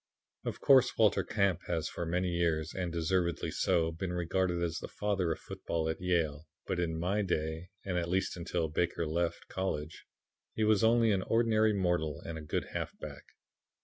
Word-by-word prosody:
"Of - - -4
course, 135 -3 +5
Walter 110 -2 +4
Camp 100 -5 +1
has 85 -3 -1
for 85 - -4
many 90 +2 0
years, 85 -2 0
and 90 -2 -2
deservedly 85 0 0
so, 80 -1 +2
been 90 +3 -4
regarded 90 0 0
as 85 -1 -1
the - - -6
father 100 -5 -1
of 80 - -1
football 80 -1 -3
at 80 +4 -3
Yale, 80 -4 0 0.2
but - - -2
in 80 -2 -1
my 95 +5 +1
day, 80 -2 -2 0.2
and 90 -2 0
at 85 0 -3
least 95 +2 0
until 85 -1 -1
Baker 85 +2 0
left 85 +2 -1
college, 80 -5 -3 0.5
he 110 - +1
was 110 -1 +4
only 115 0 +5
an 95 -2 +2
ordinary 110 0 +3
mortal 90 -6 0
and 85 - -5
a 80 - -6
good 75 - -3
halfback. - - -6
85 Hz, 180 wpm, -32 LUFS, 80-95 Hz, 0.5 s, course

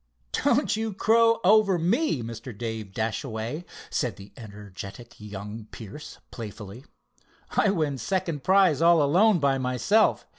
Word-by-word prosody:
"Don't - - +1
you 220 -1 -3
crow 230 +2 +4
over 200 -1 +5
me, 175 - 0
Mr. 115 0 -8
Dave 110 -3 -5
Dashaway," 115 - -3 0.3
said 125 -5 -1
the 100 0 -14
energetic 105 0 -10
young 105 +1 -8
Pierce, 115 +7 -10
playfully. 110 +2 -9 0.7
"I 205 - +2
win 155 -8 -1
second 170 -1 -2
prize, 190 -6 +4
all 170 -2 +5
alone 185 +8 +4
by 140 -3 +1
myself. 130 - +2
135 Hz, 125 wpm, -26 LUFS, -, 0.7 s, over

